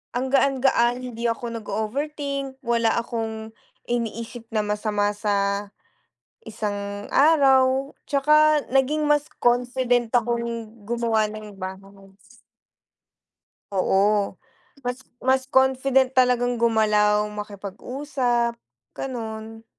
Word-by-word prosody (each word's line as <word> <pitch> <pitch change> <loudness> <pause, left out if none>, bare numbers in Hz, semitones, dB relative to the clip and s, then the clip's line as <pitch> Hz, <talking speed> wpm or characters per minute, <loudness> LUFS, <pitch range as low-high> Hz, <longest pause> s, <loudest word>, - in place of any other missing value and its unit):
ang 260 +1 -1
gaan-gaan 270 -3 +3
hindi 235 -1 -3
ako 230 0 -3
nag-ooverthink, 275 +6 -3
wala 230 -2 +2
akong 225 -2 -4 0.3
iniisip 230 0 -4
na 220 -2 -1
masama 210 0 0
sa 200 -1 -1 0.8
isang 205 -2 -4
araw, 270 -2 +4
tsaka 300 +1 +3
naging 280 +3 +1
mas 295 0 +2
confident 245 -1 +1
akong 235 -1 -1 0.2
gumawa 225 -1 0
ng 215 -1 -9
bahay. 195 +1 -9 1.6
Oo 195 +1 +2 0.5
mas 245 +1 -3 0.2
mas 260 0 +2
confident 265 0 +3
talagang 245 -1 +3
gumalaw 210 -2 +3
makipag-usap, 235 +4 -2 0.4
ganon. 225 -3 -6
235 Hz, 90 wpm, -24 LUFS, 210-260 Hz, 1.6 s, araw